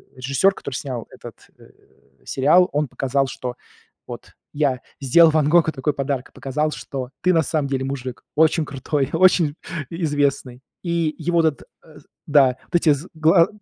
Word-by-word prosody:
режиссёр, 140 +10 +1
который 130 - -7
снял 125 -3 -5
этот, - - -13
э, - - -17 0.6
сериал, 165 +7 +3
он 150 -1 0
показал, 135 +2 -1
что 125 -1 -6 0.5
вот, - - -9 0.2
я 140 -4 0 0.2
сделал 160 +5 +5
Ван 150 -1 +2
Гогу 160 -1 +4
такой 145 +1 -2
подарок, 140 -2 -3
и - - -34
показал, 150 +3 -2
что 130 -4 -6
ты 180 0 +3
на 165 - +4
самом 150 -1 -1
деле 135 -1 -2
мужик, 130 -2 -6
очень 160 +1 +3
крутой, 140 0 -2
очень 165 -3 +3 0.3
и 170 +1 -6
известный. 140 -4 -1 0.2
И 170 -3 -1
его 170 -1 +1
этот 160 -3 0 0.2
э, - - -17 0.3
да 135 -4 +4
вот - - -3
эти 165 -2 +4
з 145 +5 -6
гла 165 +2 +4
145 Hz, 165 wpm, -21 LUFS, 135-160 Hz, 0.6 s, сделал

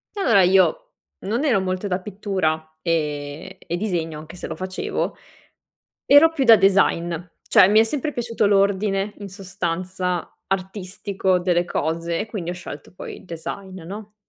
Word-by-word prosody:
E - - -5
allora 225 - +5
io 195 - +3 0.3
non 230 +8 -2
ero 235 -9 +3
molto 185 +2 -2
da 185 0 -1
pittura 180 -6 -2
e 150 -3 -2
e 175 - -4
disegno, 165 -6 -2
anche 160 +3 -11
se - - -6
lo - - -5
facevo. 185 0 -3 0.9
Ero 300 +3 +7
più 275 -5 0
da 225 -2 +9
design. 190 -3 +3 0.3
Cioè, 200 -4 +7
mi 215 +2 +6
è - - +5
sempre 295 +5 -2
piaciuto 230 -3 0
l'ordine, 200 0 +2
in 200 -1 -7
sostanza, 185 -2 -3 0.2
artistico 190 0 -1
delle 175 -1 +2
cose 165 +1 -2
e 215 - -3
quindi 185 -6 -4
ho - - -2
scelto 175 -5 -9
poi - - -8
il - - -15
design, 185 +2 -7
no? 210 +4 -9
190 Hz, 160 wpm, -22 LUFS, 175-205 Hz, 0.9 s, da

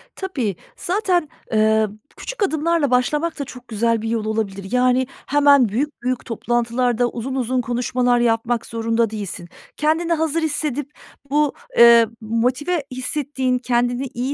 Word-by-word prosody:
Tabii, 265 - -3 0.2
zaten, 355 -4 0 0.2
ııı, 220 -1 +3 0.3
küçük - - -4
adımlarla 315 -4 +1
başlamak 300 +6 +1
da 280 - -2
çok 250 0 -12
güzel 230 0 0
bir 225 - -3
yol 225 -2 -1
olabilir. 200 -3 -3
Yani 250 0 +2 0.2
hemen 285 -5 +5
büyük 275 +6 -3
büyük 255 0 -2
toplantılarda 240 +1 0
uzun 260 +3 -5
uzun 255 0 0
konuşmalar 245 +1 +1
yapmak 230 0 +1
zorunda 230 0 0
değilsin. 195 -5 -6 0.3
Kendini 320 +3 +1
hazır 320 0 0
hissedip 295 -2 -2 0.4
bu, 295 0 +2 0.3
ııı, 235 -1 +8
motive 255 +9 0
hissettiğin, 260 0 -1
kendini 245 +1 0
iyi 255 +4 -2
250 Hz, 135 wpm, -21 LUFS, 230-290 Hz, 0.4 s, ııı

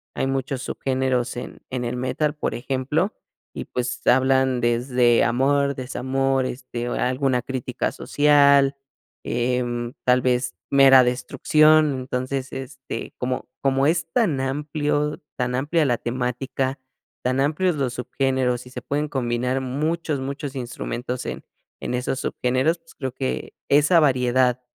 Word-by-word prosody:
Hay - - 0
muchos 135 -1 -2
subgéneros 130 -2 -1
en - - -7
en 125 -1 -3
el 120 +1 -2
metal, 130 +4 -1
por - - -2
ejemplo, 135 - -1 0.4
y - - -5
pues 125 0 -3
hablan 130 0 +3
desde 120 0 +3
amor, 140 +4 +2
desamor, 135 +1 -1
este, 120 -1 -5
alguna 130 0 0
crítica 130 -2 -3
social, 140 -1 +4 0.5
em, 120 0 -1
tal 125 0 +4
vez 125 0 0 0.2
mera 135 -2 +7
destrucción. 150 +4 +3
Entonces, 130 +1 -3
este, 130 -2 -7
como 125 0 -2
como 135 0 +2
es 165 0 0
tan 175 - +1
amplio 150 +2 -1 0.2
tan 125 -1 -1
amplia 150 +4 +1
la 120 -3 +2
temática, 130 +2 -2 0.4
tan 130 +1 0
amplios 155 +5 +1
los 135 -4 -1
subgéneros 125 -1 -1
y - - -12
se 125 0 -7
pueden 145 +4 -2
combinar 125 0 -1
muchos, 150 +3 -2
muchos 140 +1 -5
instrumentos 125 -1 -4
en - - -5 0.4
en - - -4
esos 125 +1 -1
subgéneros, 130 +7 0
pues 165 0 -20
creo 130 -3 -4
que 130 0 -3 0.2
esa 150 +4 +5
variedad 125 -3 +2
130 Hz, 135 wpm, -23 LUFS, 125-140 Hz, 0.5 s, mera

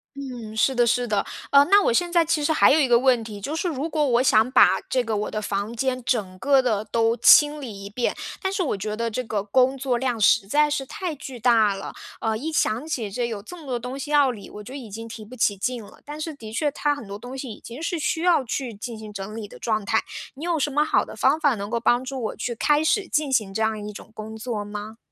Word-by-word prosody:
嗯， 245 -6 -7
是 265 +4 +2
的 240 -1 +4
是 245 +1 +1
的。 210 -2 0 0.2
呃， 280 0 +7
那 405 0 +7
我 - - +3
现 345 +7 +1
在 340 -1 +5
其 310 -2 0
实 315 - +2
还 - - +5
有 315 - +5
一 275 - +3
个 235 -1 +5
问 250 -3 +3
题， 210 -2 -8
就 300 +9 -3
是 355 - -1
如 310 0 -2
果 305 -2 +1
我 240 0 +3
想 230 -1 +4
把 260 - +6
这 255 - +1
个 225 -3 -2
我 210 - -3
的 215 - -3
房 205 +3 -3
间 255 +1 -1
整 195 -7 -1
个 275 +3 +4
地 215 -5 0
都 230 0 +2
清 295 +5 +6
理 210 -7 -8
一 - - -7
遍， 235 +4 -1 0.2
但 380 0 -2
是 390 - -1
我 280 - -1
觉 210 +2 -4
得 230 +1 -2
这 255 +3 -3
个 215 -3 -2
工 255 +6 +2
作 260 -2 -1
量 245 -3 -1
实 205 +1 +5
在 295 +5 +3
是 275 -2 -2
太 345 +3 -5
巨 265 -3 -9
大 225 -3 +4
了。 195 - -7 0.3
呃， 220 -1 0
一 310 +7 -4
想 250 -1 0
起 230 -9 -2
这 240 +4 -2
有 220 -4 -5
这 355 - -10
么 320 - -12
多 250 -3 -2
东 250 +3 -6
西 290 +2 -6
要 290 -3 +5
理， 215 -5 -7
我 210 - -9
就 250 +6 -9
已 255 -5 -7
经 225 +2 -7
提 220 -1 -9
不 250 +4 -11
起 205 -4 +1
劲 240 +2 -2
了， - - -15
但 300 +1 -7
是 320 - -3
的 220 -5 -10
确 295 +5 +1
它 290 0 0
很 235 -8 -9
多 200 +1 -6
东 245 +4 -9
西 260 -3 -6
已 - - -10
经 240 +6 -9
是 335 +1 -2
需 320 +1 -1
要 345 -6 +3
去 250 0 -3
进 225 +3 -7
行 215 -1 -9
整 205 +2 -7
理 215 -2 -6
的 - - -13
状 215 -2 -1
态。 - - +1 0.3
你 305 +5 -7
有 335 -3 0
什 290 - +1
么 295 +2 +2
好 - - +2
的 - - -10
方 280 +4 +2
法， 290 -6 +3
能 200 +2 -6
够 235 - 0
帮 240 +2 +2
助 260 -1 -5
我 - - -3
去 240 - -3
开 295 +6 +2
始 380 +3 +1
进 295 -3 0
行 215 -6 +1
这 220 +3 -1
样 220 -1 -1
一 - - -5
种 215 - -12
工 220 0 -8
作 220 -2 -4
吗？ 210 +2 -7
245 Hz, 300 characters per minute, -24 LUFS, 215-285 Hz, 0.3 s, 呃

